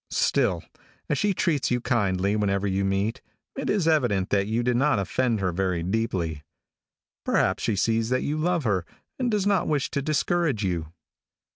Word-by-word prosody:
Still, - - +1 0.5
as - - +1
she 205 -1 +2
treats 155 -7 +1
you 125 - +1
kindly 100 -5 +1
whenever 100 -1 0
you 100 0 0
meet, 100 +5 -1 0.3
it 270 - -3
is 195 -6 +1
evident 120 - +2
that 100 -1 +2
you 115 +2 0
did 125 0 +1
not 140 0 +3
offend 115 +4 0
her 90 -2 +1
very 90 -1 -1
deeply. 90 -6 -1 0.8
Perhaps 95 +1 +1
she 110 - 0
sees 115 +3 +1
that 130 0 +1
you 145 - -1
love 170 +1 0
her, 100 -7 +1 0.4
and 250 -2 +1
does 210 -3 0
not 200 -3 +2
wish 145 -3 0
to 140 - -1
discourage 155 -4 0
you. 85 -4 -2
115 Hz, 175 wpm, -25 LUFS, 95-150 Hz, 0.8 s, not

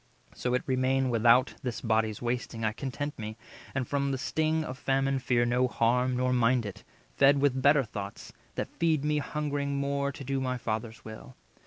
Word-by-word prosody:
So 125 0 -1
it 125 - 0
remain 130 0 +1
Without 120 +3 +4
this 125 -5 -3
body's 110 -1 0
wasting, 120 -1 -2
I 110 - +2
content 140 +4 -5
me, 110 0 -6 0.4
And 130 -3 -1
from 140 -1 0
the 135 - -1
sting 155 +4 0
of 130 -2 -6
famine 135 0 +1
fear 120 -2 +2
no 125 +2 +2
harm; 125 +1 +1
Nor 125 0 +1
mind 120 -1 +3
it, 100 - -7 0.3
fed 140 +1 +6
with 135 -2 +2
better 140 +1 +5
thoughts, 100 -3 -7 0.2
that - - -3
feed 160 -4 +2
Me 150 0 +2
hungering 145 -1 -2
more 140 0 0
to 140 - -9
do 135 +1 -1
my 130 -1 -1
Father's 110 0 -4
will." 110 +3 -10
130 Hz, 185 wpm, -29 LUFS, 120-140 Hz, 0.4 s, fed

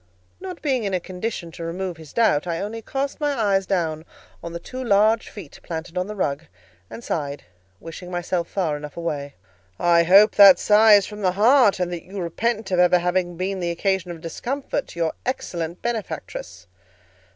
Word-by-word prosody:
Not 370 -2 -8
being 265 -6 0
in 195 -2 -1
a - - 0
condition 180 -1 -5
to 165 - -8
remove 175 +1 -4
his 160 -3 -13
doubt, 180 -9 +2
I 165 -1 -2
only 220 +3 -5
cast 270 +6 -3
my 290 -1 +1
eyes 200 -5 +1
down 160 -5 -1 0.4
on 170 - -7
the 170 - -5
two 255 +8 -7
large 220 0 +3
feet 185 -9 -11
planted 165 +1 -6
on 180 +1 -1
the 210 - -6
rug, 150 -4 -2 0.4
and 235 - -9
sighed, 145 -6 -3 0.4
wishing 165 +2 -9
myself 175 -1 -2
far 170 -6 -1
enough 150 +1 -8
away. 150 -4 -4 0.4
"I 170 -1 +4
hope 195 +5 +6
that 200 -3 +9
sigh 215 +2 +6
is 200 -2 +4
from 210 0 -9
the 185 -2 +1
heart, 220 0 +4
and 180 -1 -1
that 170 - -5
you 195 +2 -8
repent 210 +4 -2
of 180 - +2
ever 180 0 +5
having 175 0 -1
been 190 +2 -2
the 175 -1 -2
occasion 190 +1 -1
of 170 -2 -7
discomfort 265 - -4
to 170 - -10
your 165 -1 0
excellent 170 -9 -4
benefactress." 190 - -5
185 Hz, 190 wpm, -23 LUFS, 170-210 Hz, 0.4 s, that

